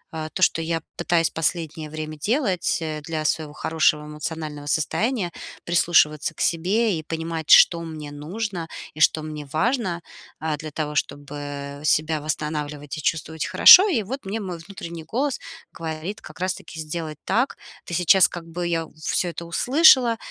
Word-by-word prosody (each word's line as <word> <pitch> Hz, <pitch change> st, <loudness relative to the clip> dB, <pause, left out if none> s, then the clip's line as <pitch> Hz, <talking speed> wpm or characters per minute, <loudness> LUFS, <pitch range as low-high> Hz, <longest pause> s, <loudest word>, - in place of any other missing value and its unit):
э, 155 Hz, -1 st, -4 dB
то, 185 Hz, -, 0 dB
что 165 Hz, -, +3 dB
я 165 Hz, 0 st, -2 dB
пытаюсь 165 Hz, -2 st, +1 dB
последнее 160 Hz, -1 st, -2 dB
время 155 Hz, 0 st, -6 dB
делать, 205 Hz, -, 0 dB
э, 155 Hz, -1 st, -4 dB
для 155 Hz, 0 st, -4 dB
своего 155 Hz, 0 st, -1 dB
хорошего 155 Hz, -1 st, +1 dB
эмоционального 150 Hz, -1 st, -6 dB
состояния: 190 Hz, -, 0 dB, 0.3 s
прислушиваться 165 Hz, -2 st, +2 dB
к -, -, -7 dB
себе 185 Hz, +3 st, +1 dB
и -, -, -5 dB
понимать, 160 Hz, 0 st, -5 dB
что 170 Hz, -1 st, +7 dB
мне 155 Hz, -3 st, -7 dB
нужно 175 Hz, +4 st, -5 dB, 0.3 s
и 155 Hz, -, -12 dB
что 155 Hz, +1 st, +4 dB
мне 150 Hz, -1 st, -6 dB
важно. 180 Hz, -, -1 dB, 0.4 s
Э, 155 Hz, -1 st, -1 dB
для 155 Hz, +2 st, -7 dB
того, 150 Hz, 0 st, -3 dB
чтобы 145 Hz, -1 st, -4 dB
себя 155 Hz, 0 st, +1 dB
восстанавливать 150 Hz, -1 st, -4 dB
и -, -, -5 dB
чувствовать 160 Hz, +1 st, -2 dB
хорошо. 375 Hz, +3 st, +9 dB
И 245 Hz, -, +1 dB
вот 260 Hz, +6 st, -6 dB
мне 205 Hz, +4 st, -3 dB
мой 180 Hz, -5 st, -5 dB
внутренний 170 Hz, -2 st, -8 dB
голос 255 Hz, -, -2 dB, 0.3 s
говорит 165 Hz, +5 st, -6 dB
как -, -, -13 dB
раз-таки 175 Hz, -3 st, -4 dB
сделать 155 Hz, -1 st, -5 dB
так. 250 Hz, +4 st, 0 dB, 0.3 s
Ты 175 Hz, -, -4 dB
сейчас 180 Hz, +1 st, +6 dB
как 175 Hz, -2 st, -8 dB
бы 175 Hz, +1 st, -4 dB
я 165 Hz, -1 st, -1 dB
всё 160 Hz, +3 st, -1 dB
это 170 Hz, 0 st, -7 dB
услышала. 250 Hz, -, +5 dB
160 Hz, 160 wpm, -23 LUFS, 155-180 Hz, 0.4 s, хорошо